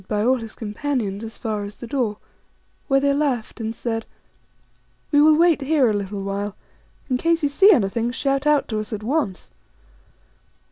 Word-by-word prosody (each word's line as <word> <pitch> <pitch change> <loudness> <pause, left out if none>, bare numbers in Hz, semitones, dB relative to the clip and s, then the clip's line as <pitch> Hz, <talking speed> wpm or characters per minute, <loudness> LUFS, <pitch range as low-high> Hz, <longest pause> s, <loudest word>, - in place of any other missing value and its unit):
2J 210 +1 +1
all 260 +1 +4
his 225 -2 -8
companions 215 -2 -3
as 225 0 -8
far 215 -3 -3
as 205 +1 -8
the - - -9
door, 230 -4 -1 0.7
where 275 -1 +4
they 280 0 +2
laughed 265 -6 -1
and 225 +1 -3
said, 225 -1 -3 0.6
" - - -40
We 290 -1 +5
will 305 0 +6
wait 335 -2 +4
here 275 -4 +3
a - - -1
little 200 -1 -3
while. 200 +1 -3 0.5
In 255 - +1
case 335 +1 +1
you 290 - +3
see 385 +9 +6
anything, 230 - +1
shout 275 +3 -1
out 300 -2 +3
to 215 -2 -1
us 215 +1 -6
at 215 0 -5
once." 250 - -2
240 Hz, 185 wpm, -22 LUFS, 210-285 Hz, 0.7 s, will